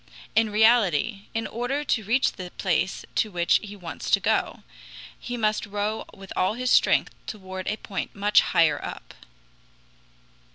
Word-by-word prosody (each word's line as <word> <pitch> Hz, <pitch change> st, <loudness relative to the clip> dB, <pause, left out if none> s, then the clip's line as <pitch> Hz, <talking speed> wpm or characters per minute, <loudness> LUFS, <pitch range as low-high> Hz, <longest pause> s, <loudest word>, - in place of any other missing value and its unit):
In 225 Hz, 0 st, +4 dB
reality, 210 Hz, -3 st, +3 dB
in 225 Hz, 0 st, -1 dB
order 250 Hz, +5 st, -2 dB
to 235 Hz, -6 st, 0 dB
reach 235 Hz, +6 st, +2 dB
the 180 Hz, -1 st, -8 dB
place 185 Hz, +1 st, 0 dB
to 215 Hz, -, +1 dB
which 175 Hz, -3 st, +2 dB
he 205 Hz, -1 st, -9 dB
wants 175 Hz, -5 st, -7 dB
to -, -, +5 dB
go, -, -, 0 dB, 0.6 s
he 245 Hz, 0 st, -5 dB
must 215 Hz, -2 st, 0 dB
row 205 Hz, +2 st, -2 dB
with 195 Hz, -1 st, -11 dB
all 185 Hz, +4 st, +1 dB
his 250 Hz, +1 st, -1 dB
strength -, -, +4 dB
toward 190 Hz, -3 st, -7 dB
a 215 Hz, -, -1 dB
point 195 Hz, -4 st, -5 dB
much 205 Hz, +1 st, +4 dB
higher 165 Hz, -2 st, +2 dB
up. -, -, -8 dB
210 Hz, 155 wpm, -25 LUFS, 190-225 Hz, 0.6 s, to